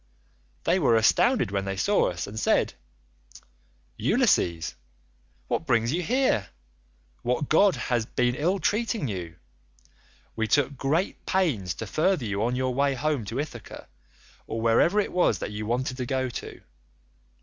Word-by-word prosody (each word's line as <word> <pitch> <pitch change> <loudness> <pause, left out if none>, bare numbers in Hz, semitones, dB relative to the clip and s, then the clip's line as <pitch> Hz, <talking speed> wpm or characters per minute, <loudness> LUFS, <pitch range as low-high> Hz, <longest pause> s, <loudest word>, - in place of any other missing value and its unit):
They 180 +3 +2
were 130 -8 +3
astounded 150 - +3
when 100 -1 -1
they 95 0 -3
saw 205 - +2
us 90 0 -4
and 105 +2 -6
said, - - +2 1.3
'Ulysses, 85 -2 +2 0.7
what 165 - -2
brings 115 0 +2
you 175 - 0
here? 225 - +1 0.7
What 125 +4 -1
god 195 +4 +5
has 120 -3 -1
been 125 -1 +1
ill 170 +9 0
treating 215 - 0
you? 90 -6 -5 1.0
We 110 -1 -1
took 140 +2 +2
great 150 +8 -1
pains 125 - 0
to 115 - -5
further 155 - +1
you 100 -1 -2
on 120 +3 0
your 130 0 -1
way 140 +1 +1
home 145 -3 -1
to 115 +6 -4
Ithaca, 130 -7 -7 0.6
or 115 - -4
wherever 115 - +3
it 205 - -1
was 175 - +2
that - - -5
you 105 0 -5
wanted 130 +3 -1
to 125 -2 -3
go 130 -1 -1
to. 120 - -8
125 Hz, 150 wpm, -26 LUFS, 110-160 Hz, 1.3 s, god